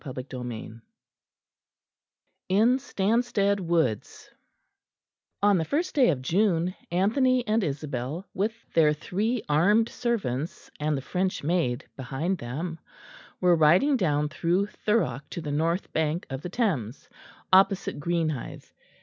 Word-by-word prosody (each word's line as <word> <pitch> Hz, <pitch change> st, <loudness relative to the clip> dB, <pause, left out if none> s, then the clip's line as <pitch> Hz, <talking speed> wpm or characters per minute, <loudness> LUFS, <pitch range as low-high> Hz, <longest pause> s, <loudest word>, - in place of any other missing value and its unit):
CHAPTER 130 Hz, -2 st, -6 dB
VIII 115 Hz, -2 st, -7 dB, 1.7 s
IN 225 Hz, +7 st, +4 dB
STANSTEAD 200 Hz, -2 st, +1 dB
WOODS 165 Hz, -, -1 dB, 1.1 s
On 205 Hz, -3 st, +5 dB
the -, -, +1 dB
first 320 Hz, -, -1 dB
day 270 Hz, -5 st, +4 dB
of 130 Hz, -5 st, -1 dB
June, 180 Hz, +2 st, +1 dB, 0.2 s
Anthony 245 Hz, +8 st, +2 dB
and 220 Hz, 0 st, +1 dB
Isabel, 145 Hz, +2 st, -4 dB
with 205 Hz, +4 st, 0 dB, 0.2 s
their 155 Hz, -2 st, +5 dB
three 210 Hz, +9 st, -2 dB
armed 205 Hz, +10 st, +3 dB
servants 170 Hz, -, -3 dB
and 150 Hz, -1 st, 0 dB
the 135 Hz, -, -5 dB
French 185 Hz, +1 st, -2 dB
maid 145 Hz, -6 st, 0 dB
behind 155 Hz, +8 st, -3 dB
them, 160 Hz, +8 st, -5 dB, 0.6 s
were 180 Hz, -1 st, +4 dB
riding 170 Hz, -, +4 dB
down 150 Hz, -, +1 dB
through 175 Hz, +5 st, +1 dB
Thurrock 210 Hz, -8 st, -1 dB
to -, -, -5 dB
the 150 Hz, -2 st, -4 dB
north 165 Hz, +5 st, -1 dB
bank 160 Hz, +2 st, 0 dB
of 135 Hz, 0 st, -4 dB
the 180 Hz, -, -5 dB
Thames 160 Hz, -, -2 dB, 0.5 s
opposite 195 Hz, -3 st, +4 dB
Greenhithe. 160 Hz, -4 st, -2 dB
170 Hz, 125 wpm, -26 LUFS, 145-205 Hz, 1.7 s, On